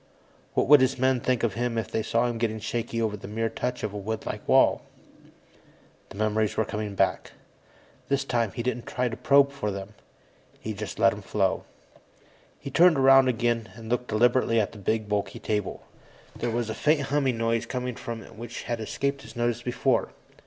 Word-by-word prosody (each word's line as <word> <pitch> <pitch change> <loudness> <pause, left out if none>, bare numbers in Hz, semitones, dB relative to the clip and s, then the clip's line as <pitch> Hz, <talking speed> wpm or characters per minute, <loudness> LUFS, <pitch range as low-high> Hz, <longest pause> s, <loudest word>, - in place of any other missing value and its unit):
What - - +2
would 145 -1 +8
his 130 0 +2
men 130 0 +2
think 125 0 0
of 115 -4 +1
him 120 +1 -2
if 115 - -3
they 110 - 0
saw 115 +2 +1
him 120 -2 -2
getting 110 -1 -1
shaky 115 +1 -3
over 110 -2 0
the 100 - -9
mere 115 +2 -1
touch 125 +3 -3
of 105 -1 -2
a 105 - -4
woodlike 110 +2 -4
wall? - - +4 1.3
The - - -11
memories 110 0 0
were 110 - +2
coming 105 -1 -4
back. 95 -1 0 0.7
This 140 0 0
time, 115 -5 0
he 120 - -4
didn't 125 -1 -3
try 125 0 -1
to 115 - -5
probe 140 0 +4
for 140 -7 -3
them; 100 +1 -6 0.7
he 110 - -4
just 105 0 -6
let 115 +1 +5
them 105 - -7
flow. 95 -1 0 0.9
He 140 - -8
turned 170 +1 +6
around 135 0 +6
again 120 -2 0
and 115 -1 -10
looked 125 +1 -1
deliberately 120 +1 +3
at 105 - 0
the 105 - -12
big, 110 +2 -1
bulky 105 -1 -2
table. 105 -3 -3 0.5
There 120 - -2
was 115 0 -1
a 110 - -3
faint 150 +6 +2
humming 135 -3 0
noise 115 0 0
coming 125 -1 -3
from 115 0 -6
it - - -14
which 120 +2 -7
had 120 -1 -3
escaped 140 +5 -2
his - - -12
notice 120 0 0
before. 120 0 0
115 Hz, 195 wpm, -26 LUFS, 110-125 Hz, 1.3 s, would